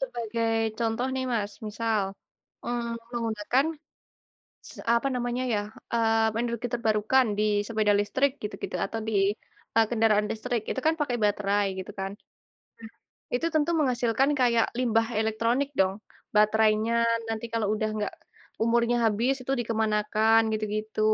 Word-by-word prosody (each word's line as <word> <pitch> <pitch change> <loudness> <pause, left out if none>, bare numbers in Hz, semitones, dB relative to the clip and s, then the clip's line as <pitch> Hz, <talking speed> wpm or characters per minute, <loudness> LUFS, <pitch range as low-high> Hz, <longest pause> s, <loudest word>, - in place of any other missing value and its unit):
Sebagai 230 -3 -2 0.3
contoh 230 +2 0
nih 260 0 -1
Mas 205 -3 -1
misal, 215 0 0 0.6
mmm, 235 -1 -2 0.2
menggunakan 230 +2 0 1.1
se - - -12 0.2
apa 255 +4 +1
namanya 245 +1 -1
ya? 210 - +2 0.3
Eee, 225 -1 +2
energi 235 0 -2
terbarukan 225 +2 +2
di 210 - +2 0.2
sepeda 215 -2 +2
listrik 260 +7 +1
gitu-gitu 210 - -5
atau 225 +3 -4
di, 220 - -2 0.6
ah, 225 0 +5
kendaraan 220 -2 +3
listrik. 230 +1 -2
Itu - - -2
kan 320 - +5
pakai 250 -5 0
baterai 205 0 +2
gitu 190 +2 -6
kan. 195 0 -3 1.2
Nah, - - -5
itu 330 - -1
tentu 310 +2 +2
menghasilkan 250 -1 +2
kayak 235 -2 +4
limbah 225 -2 +2
elektronik 230 +5 +1
dong? 190 0 +3 0.4
Baterainya 215 +1 +3 0.4
nanti 225 0 -3
kalau 225 -2 0
udah 215 0 -1
nggak 210 -2 -2 0.5
umurnya 235 +1 +2
habis 230 +5 +2
itu 265 - -2
dikemanakan 220 0 +2
gitu-gitu. 215 0 -3
225 Hz, 135 wpm, -27 LUFS, 215-240 Hz, 1.2 s, ah